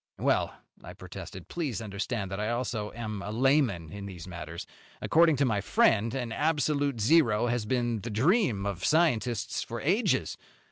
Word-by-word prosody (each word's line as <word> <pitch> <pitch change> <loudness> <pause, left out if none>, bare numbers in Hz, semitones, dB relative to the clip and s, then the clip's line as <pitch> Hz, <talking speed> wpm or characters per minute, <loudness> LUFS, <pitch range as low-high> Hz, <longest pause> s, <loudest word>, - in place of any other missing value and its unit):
"Well," - - +1 0.3
I - - -9
protested, 95 -2 -9
"please 150 - -3
understand 105 -1 -4
that 95 - -3
I 105 +1 -1
also 120 -3 -2
am 110 -3 -5
a 100 - -6
layman 115 - +1
in 100 +1 -7
these 90 -3 -9
matters. 85 -2 -7 0.3
According 165 -1 +4
to 140 +1 +2
my 110 -5 +1
friend, 110 +4 +2
an 125 -3 -3
absolute 145 -2 0
zero 120 -3 +4
has 120 -3 -1
been 120 -2 0
the 115 - -6
dream 125 - +2
of 95 -3 -3
scientists 120 -8 +1
for 115 0 -5
ages. 190 - +1
115 Hz, 160 wpm, -29 LUFS, 100-140 Hz, 0.3 s, According